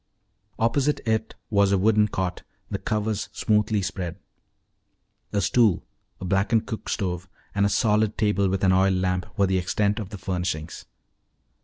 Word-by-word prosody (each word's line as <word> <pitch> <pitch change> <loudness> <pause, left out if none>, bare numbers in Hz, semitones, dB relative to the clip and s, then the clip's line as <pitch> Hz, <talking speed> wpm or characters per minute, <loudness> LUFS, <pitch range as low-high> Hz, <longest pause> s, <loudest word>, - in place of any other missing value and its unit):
Opposite 135 +6 +1
it 110 -1 -1 0.2
was 100 -1 +4
a 100 - +4
wooden 105 +2 +4
cot, 95 -3 -3 0.3
the - - -2
covers 105 -1 -2
smoothly 105 -1 +1
spread. 90 -2 -4 1.1
A 100 - +1
stool, 105 -1 +3 0.4
a - - -6
blackened 100 +4 +2
cook 110 -3 -6
stove, 90 -3 -2 0.2
and 100 0 +2
a - - 0
solid 105 -1 +2
table 105 -3 +2
with 95 +1 -1
an 95 - +5
oil 95 +1 +4
lamp 90 -1 0
were 100 - +4
the 95 -1 +1
extent 100 +4 0
of 105 -4 -5
the 105 - -7
furnishings. 90 -4 -3
100 Hz, 155 wpm, -25 LUFS, 95-110 Hz, 1.1 s, an